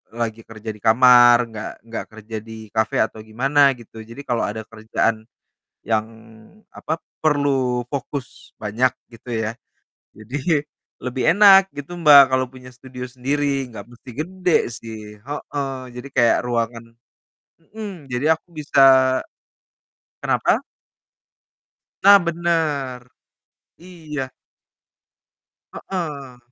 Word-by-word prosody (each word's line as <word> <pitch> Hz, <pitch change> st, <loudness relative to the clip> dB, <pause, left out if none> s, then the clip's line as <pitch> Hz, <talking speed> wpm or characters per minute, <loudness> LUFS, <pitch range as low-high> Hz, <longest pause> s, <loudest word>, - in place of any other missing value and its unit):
lagi 115 Hz, -1 st, -3 dB
kerja 110 Hz, 0 st, -8 dB
di -, -, -16 dB
kamar, 120 Hz, +1 st, +7 dB
nggak 110 Hz, -1 st, -6 dB, 0.2 s
nggak 115 Hz, -, -5 dB
kerja 110 Hz, 0 st, -8 dB
di 110 Hz, 0 st, -11 dB
cafe 110 Hz, 0 st, +1 dB
atau -, -, -6 dB
gimana 135 Hz, +5 st, +3 dB
gitu. 115 Hz, -1 st, -12 dB
Jadi 115 Hz, +5 st, -10 dB
kalo 120 Hz, -1 st, 0 dB
ada 110 Hz, +2 st, -4 dB
kerjaan 110 Hz, 0 st, -1 dB, 0.6 s
yang 110 Hz, -1 st, 0 dB, 0.7 s
apa, 160 Hz, -, -4 dB, 0.3 s
perlu 135 Hz, -5 st, +1 dB
fokus 140 Hz, -1 st, -6 dB
banyak 110 Hz, +4 st, +1 dB, 0.2 s
gitu 115 Hz, +2 st, -15 dB
ya, 110 Hz, -, -2 dB, 0.7 s
jadi 140 Hz, -, -1 dB, 0.4 s
lebih 125 Hz, 0 st, -2 dB
enak 195 Hz, -2 st, +8 dB
gitu 145 Hz, +5 st, -7 dB
Mbak 145 Hz, -4 st, +9 dB
kalo 130 Hz, 0 st, +2 dB
punya 125 Hz, -1 st, -12 dB
studio 125 Hz, 0 st, -9 dB
sendiri, 135 Hz, +2 st, -1 dB
nggak -, -, -8 dB
mesti 120 Hz, +1 st, -13 dB
gede 180 Hz, +2 st, 0 dB, 0.2 s
sih 115 Hz, -2 st, -8 dB, 0.2 s
heeh. 140 Hz, +1 st, -5 dB, 0.2 s
Jadi 125 Hz, +3 st, -7 dB
kayak 115 Hz, -, +4 dB
ruangan 115 Hz, -1 st, -2 dB, 0.9 s
hmm, 195 Hz, -10 st, -8 dB
jadi 125 Hz, +5 st, -1 dB
aku -, -, -35 dB
bisa 145 Hz, -2 st, +1 dB, 1.4 s
kenapa? -, -, +1 dB, 1.4 s
Nah 200 Hz, 0 st, +9 dB
benar, 160 Hz, -7 st, -1 dB, 0.8 s
iya. 160 Hz, -5 st, -7 dB, 1.5 s
Heeh, 145 Hz, -9 st, -6 dB
130 Hz, 110 wpm, -21 LUFS, 115-145 Hz, 1.5 s, Mbak